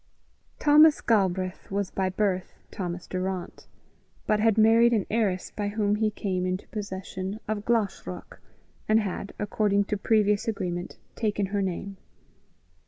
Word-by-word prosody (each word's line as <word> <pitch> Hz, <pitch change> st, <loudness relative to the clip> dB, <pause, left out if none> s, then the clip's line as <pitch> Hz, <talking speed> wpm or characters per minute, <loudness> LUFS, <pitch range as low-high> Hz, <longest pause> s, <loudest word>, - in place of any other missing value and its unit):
Thomas 300 Hz, +1 st, +6 dB
Galbraith 190 Hz, -4 st, 0 dB
was 200 Hz, -1 st, -2 dB
by 190 Hz, -1 st, 0 dB
birth 185 Hz, -1 st, -1 dB, 0.2 s
Thomas 180 Hz, -2 st, -5 dB
Durrant, 185 Hz, 0 st, -4 dB, 0.6 s
but 215 Hz, -, +2 dB
had 220 Hz, 0 st, +3 dB
married 230 Hz, +2 st, +6 dB
an 210 Hz, -4 st, +1 dB
heiress 205 Hz, -5 st, 0 dB
by 205 Hz, -1 st, -2 dB
whom 205 Hz, 0 st, 0 dB
he 215 Hz, 0 st, +2 dB
came 190 Hz, -3 st, -2 dB
into 185 Hz, +1 st, -3 dB
possession 190 Hz, -1 st, -5 dB
of 210 Hz, -1 st, -3 dB
Glashruach, 230 Hz, -4 st, -2 dB, 0.5 s
and 215 Hz, +1 st, +5 dB
had, 200 Hz, -1 st, -4 dB
according 205 Hz, -1 st, +1 dB
to 210 Hz, +1 st, -2 dB
previous 210 Hz, +1 st, +2 dB
agreement, 180 Hz, -5 st, -3 dB, 0.2 s
taken 210 Hz, -3 st, 0 dB
her 200 Hz, -, +1 dB
name. 195 Hz, +1 st, -4 dB
205 Hz, 135 wpm, -27 LUFS, 190-215 Hz, 0.6 s, Thomas